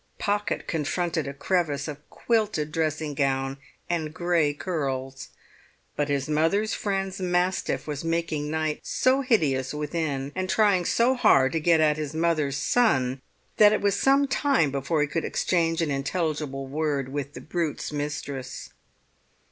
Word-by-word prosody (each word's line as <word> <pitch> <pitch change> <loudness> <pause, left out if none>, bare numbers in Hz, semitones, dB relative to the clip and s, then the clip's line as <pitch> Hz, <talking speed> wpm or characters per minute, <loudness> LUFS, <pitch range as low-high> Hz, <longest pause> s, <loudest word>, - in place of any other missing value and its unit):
Pocket 205 0 -1
confronted 165 0 -1
a 140 - -4
crevice 150 -3 0
of 150 -1 -9
quilted 215 -10 0
dressing 155 -1 -1
gown 135 0 -1 0.3
and 160 -3 -2
grey 165 -2 +1
curls; 135 -5 -4 0.7
but 145 0 -1
his 140 -1 0
mother's 165 +8 +1
friend's 195 -2 -2
mastiff 180 0 0
was 150 -1 -4
making 165 -3 -1
night 155 -1 -1
so 260 +2 +2
hideous 145 - +1
within, 150 -2 -2
and 185 0 -3
trying 200 -5 +3
so 240 +7 +3
hard 135 - +4
to 165 - 0
get 165 +1 +3
at 155 -1 +3
his 155 -1 -4
mother's 155 -4 +1
son, 135 - +2 0.4
that 210 0 +7
it - - 0
was 200 -1 +2
some 275 +5 +3
time 270 - +2
before 140 +3 0
he 150 - +2
could 165 +3 -2
exchange 165 -2 +1
an 150 - -1
intelligible 140 -1 -2
word 140 -1 -2
with 145 0 -5
the - - -7
brute's 160 -3 -3
mistress. 145 -3 -5
155 Hz, 150 wpm, -26 LUFS, 145-180 Hz, 0.7 s, that